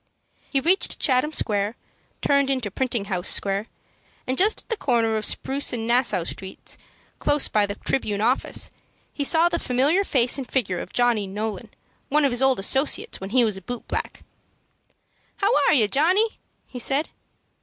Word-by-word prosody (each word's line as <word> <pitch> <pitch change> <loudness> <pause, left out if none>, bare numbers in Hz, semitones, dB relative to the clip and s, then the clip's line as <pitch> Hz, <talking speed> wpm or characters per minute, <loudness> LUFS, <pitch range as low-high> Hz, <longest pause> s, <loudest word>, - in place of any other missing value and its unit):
He 275 - +1
reached 355 +8 +2
Chatham 265 +3 +2
Square, 210 -5 +1 0.5
turned 280 -1 +3
into 255 -7 -1
Printing 240 -2 -2
House 185 -3 -2
Square, 200 +2 +1 0.6
and 255 - -1
just 410 +8 +2
at - - -31
the 455 - 0
corner 235 - +1
of 215 -1 -1
Spruce 275 0 0
and 225 -2 -2
Nassau 235 -6 +2
Streets, 190 +2 -7 0.4
close 290 -1 +2
by 210 -1 +2
the 200 - -4
Tribune 210 -4 -2
Office, 240 +5 0 0.4
he 285 - -2
saw 325 +4 +4
the 340 -1 -1
familiar 280 +10 +2
face 255 -6 +1
and 260 - -6
figure 190 -9 0
of - - -7
Johnny 240 -5 +1
Nolan, 215 +2 -5 0.4
one 295 +1 +3
of 275 - +2
his 245 +1 -1
old 265 -1 +4
associates 265 +6 -1
when 190 - -5
he 245 +2 +4
was 210 -3 -2
a - - -9
boot 245 +6 -7
black. - - -4 1.1
"How 400 +2 +1 0.2
are - - +5
you, 225 -6 +3
Johnny?" 365 - +2 0.3
he 250 - -9
said. 275 +5 0
250 Hz, 175 wpm, -23 LUFS, 210-280 Hz, 1.1 s, are